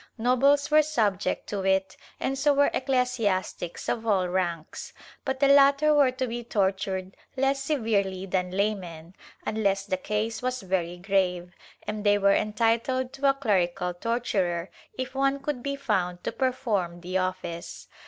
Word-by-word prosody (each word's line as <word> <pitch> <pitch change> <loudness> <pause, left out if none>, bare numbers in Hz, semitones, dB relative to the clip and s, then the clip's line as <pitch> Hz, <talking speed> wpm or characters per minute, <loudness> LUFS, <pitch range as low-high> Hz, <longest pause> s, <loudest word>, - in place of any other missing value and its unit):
Nobles 275 +5 +3
were 305 0 +7
subject 220 -10 0
to 200 -2 -2
it 190 0 +1 0.2
and 270 - -1
so 285 +1 +2
were 285 0 +4
ecclesiastics 250 -10 -1
of 230 -1 -2
all 190 -4 +2
ranks, 175 -3 -3 0.3
but 265 -1 -2
the 280 - +4
latter 280 +2 +6
were 285 -3 +5
to 255 +1 -2
be 240 0 -4
tortured 190 -3 -1 0.2
less 270 +1 +1
severely 210 -9 0
than 180 -1 -1
laymen, 185 -4 -3 0.3
unless 200 -2 0
the 190 -2 -1
case 215 +4 -2
was 255 -2 -2
very 180 -2 -1
grave, 180 -2 0 0.3
and 210 0 -4
they 205 -1 +4
were 200 0 +4
entitled 235 +5 0
to 275 0 +2
a 275 - +3
clerical 180 -8 0
torturer 185 -4 -1 0.3
if 260 0 -4
one 275 +1 +1
could 275 -2 -3
be 280 +2 -2
found 185 -10 -1
to - - -2
perform 215 -10 -1
the 180 +1 -6
office. 185 -2 -4
210 Hz, 155 wpm, -27 LUFS, 185-260 Hz, 0.3 s, were